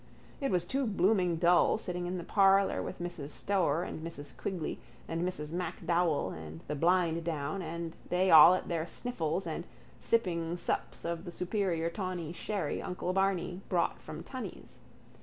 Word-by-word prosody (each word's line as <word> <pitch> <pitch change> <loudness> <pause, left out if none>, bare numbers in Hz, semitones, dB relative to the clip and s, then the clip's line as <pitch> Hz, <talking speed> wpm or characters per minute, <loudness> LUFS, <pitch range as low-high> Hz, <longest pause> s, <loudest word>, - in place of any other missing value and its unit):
It 275 - 0
was 175 -2 +1
too 270 +5 0
blooming 185 -3 +2
dull 175 +4 +4
sitting 180 -4 -4
in 180 +1 -2
the 175 - -5
parlour 195 +1 +4
with - - -5
Mrs 175 -5 -5
Stoer 175 -2 +1
and 180 - -5
Mrs 145 -3 -7
Quigley 180 -6 -3 0.3
and 165 0 -2
Mrs 175 -4 -3
MacDowell 170 - 0
and 80 0 -8
the 150 - -2
blind 170 +1 +2
down 155 +2 -2
and 165 0 -5
they 185 +1 +2
all 165 +3 +10
at - - -4
their 165 -1 -1
sniffles 180 -6 -2
and - - -3 0.4
sipping 175 -6 0
sups - - -2
of 170 0 -2
the 175 - -7
superior 175 -3 -1
tawny 180 -4 -4
sherry 190 -4 -2
uncle 180 0 -3
Barney 190 -1 0
brought 175 -2 +1
from - - -8
Tunney's. - - -8
175 Hz, 160 wpm, -31 LUFS, 165-185 Hz, 0.4 s, all